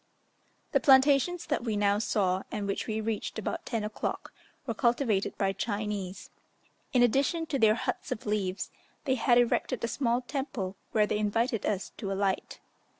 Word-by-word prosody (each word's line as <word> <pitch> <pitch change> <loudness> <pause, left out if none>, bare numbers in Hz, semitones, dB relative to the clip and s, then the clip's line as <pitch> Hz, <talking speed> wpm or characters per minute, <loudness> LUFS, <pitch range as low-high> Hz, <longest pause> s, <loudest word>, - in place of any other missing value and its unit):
The - - +4
plantations 275 +5 +4
that 295 -6 -1
we 220 -3 -1
now 205 0 +3
saw, 190 -4 +1
and 210 -1 -3
which 200 0 -2
we 220 0 -1
reached 220 0 -3
about 220 - -4
10 230 -3 -1
o'clock, 210 0 -4 0.3
were 235 - -2
cultivated 235 -3 +1
by 195 -1 +1
Chinese. 205 -2 -4 0.6
In 250 -2 +4
addition 280 +7 +2
to 285 -4 -2
their 220 -2 +5
huts 250 +2 -3
of - - -4
leaves, 205 -3 -1 0.3
they 265 - +2
had 240 -1 +3
erected 245 +1 +1
a - - +2
small 240 -1 0
temple, 245 -8 -4 0.2
where 215 -2 +4
they 210 - -1
invited 225 +2 0
us 200 -2 -2
to 195 -3 -4
alight. 195 -1 -1
220 Hz, 165 wpm, -29 LUFS, 205-255 Hz, 0.6 s, their